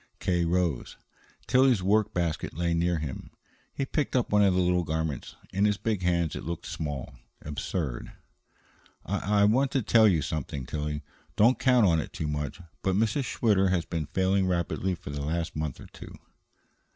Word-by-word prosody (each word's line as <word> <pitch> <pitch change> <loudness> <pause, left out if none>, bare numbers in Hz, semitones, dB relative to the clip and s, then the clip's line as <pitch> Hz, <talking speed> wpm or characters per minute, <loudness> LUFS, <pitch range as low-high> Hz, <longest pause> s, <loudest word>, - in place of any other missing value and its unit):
K. 90 -2 +1
rose. 85 -6 -1 0.5
Tillie's 130 -6 +4
work 105 +2 +2
basket 85 -6 -2
lay 85 +1 0
near 85 +1 +1
him. 75 -4 -5 0.4
He 135 - -2
picked 145 +1 -2
up 125 - +1
one 105 0 +5
of 95 -2 +4
the - - +2
little 90 0 +2
garments. 80 -3 -3 0.2
In 100 +2 +2
his 105 -1 +2
big 110 -3 -1
hands 85 -3 +1
it - - -5
looked 85 +1 -5
small, 75 -5 -5 0.3
absurd. 75 -2 -4 0.9
"I 100 +1 +1
I - - +7
want 130 +6 +3
to 135 - +1
tell 110 +1 +5
you 85 -7 +2
something, 75 -4 -4
Tillie. 75 +2 -3 0.3
Don't 120 +5 +4
count 125 -4 +4
on 85 -4 +3
it - - -5
too 80 - -3
much; 75 -2 -3 0.2
but 95 -1 +1
Mrs. 110 +6 +1
Schwitter 100 -6 +2
has 90 -2 +1
been 80 -4 -3
failing 95 +1 +1
rapidly 90 +1 -1
for 70 - -9
the 70 0 -4
last 80 +3 -2
month 75 -4 -3
or - - -10
two." - - -12
90 Hz, 180 wpm, -28 LUFS, 80-105 Hz, 0.9 s, I